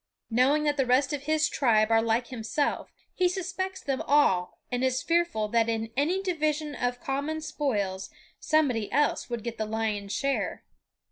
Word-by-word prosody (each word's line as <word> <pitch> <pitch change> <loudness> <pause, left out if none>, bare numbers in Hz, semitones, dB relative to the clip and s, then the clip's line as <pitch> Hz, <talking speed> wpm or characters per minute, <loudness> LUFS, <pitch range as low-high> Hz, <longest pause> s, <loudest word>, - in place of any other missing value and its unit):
Knowing 265 +6 +3
that 295 -1 +1
the 270 - +2
rest 260 +4 +3
of 285 -1 -4
his 310 0 +2
tribe 220 -4 +2
are 225 0 +5
like 230 +2 0
himself, 255 +4 -2 0.2
he 365 -1 +2
suspects 375 +1 -4
them 270 -2 -2
all 190 -12 +3
and 245 +1 -1
is 260 0 +1
fearful 335 -11 +1
that 230 +1 +2
in 225 0 -2
any 340 +8 +1
division 310 -4 -1
of 245 -2 -2
common 285 +5 -2
spoils 220 -12 -2 0.3
somebody 265 -9 +1
else 290 0 +1
would 235 -3 -4
get 235 -1 -5
the 220 - 0
lion's 215 -2 -2
share. 275 +4 -1
265 Hz, 165 wpm, -27 LUFS, 225-305 Hz, 0.3 s, are